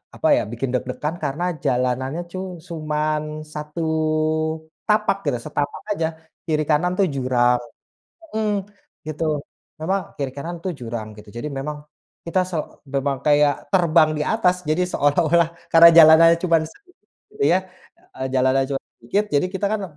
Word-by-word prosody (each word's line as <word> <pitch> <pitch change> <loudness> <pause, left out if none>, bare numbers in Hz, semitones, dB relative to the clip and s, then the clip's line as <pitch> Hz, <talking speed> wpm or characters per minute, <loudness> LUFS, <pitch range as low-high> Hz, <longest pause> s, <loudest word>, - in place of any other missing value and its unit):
apa, - - 0
ya, - - +2
bikin 120 +2 -3
deg-degan 130 +6 -3
karena 145 +4 -2 0.2
jalanannya 130 +4 0
cu 185 - -5 0.3
cuman 155 -2 -1 0.3
satu 150 +2 -5 1.1
tapak 210 -2 +2
gitu 140 -4 0
setapak 145 -1 -3
aja, 165 -6 0 0.4
kiri-kanan, 155 +2 +1
tuh, 195 - +4
jurang, 125 -2 +2 0.8
mhm, 220 -1 0 0.6
gitu. 155 +1 -3 0.6
Memang 190 +5 0 0.2
kiri-kanan, 140 +5 -4
tuh, 185 - -2
jurang 115 -2 -5
gitu, 105 0 -13
jadi 120 - -5
memang 150 +2 -4 0.5
kita 175 +3 +1
so 170 - -3 0.4
memang 140 0 0
kayak 145 -1 +5 0.2
terbang 165 -4 +4
di 150 - 0
atas 185 -5 +2
jadi 155 +4 +2
seolah-olah 165 +3 +3 0.2
karena 165 0 +10
jalanannya 165 +1 +8
cuman 165 -3 +3
sedikit 365 - -24 0.2
gitu, 425 0 -6
ya, 185 - +4 0.6
eee, 130 - -2
jalanannya 130 +1 +3
cuman 135 - -2 0.2
sedikit 195 - 0
jadi 145 +6 +3
kita, 200 +1 0
kan, 215 -2 -1
155 Hz, 140 wpm, -22 LUFS, 135-170 Hz, 1.1 s, karena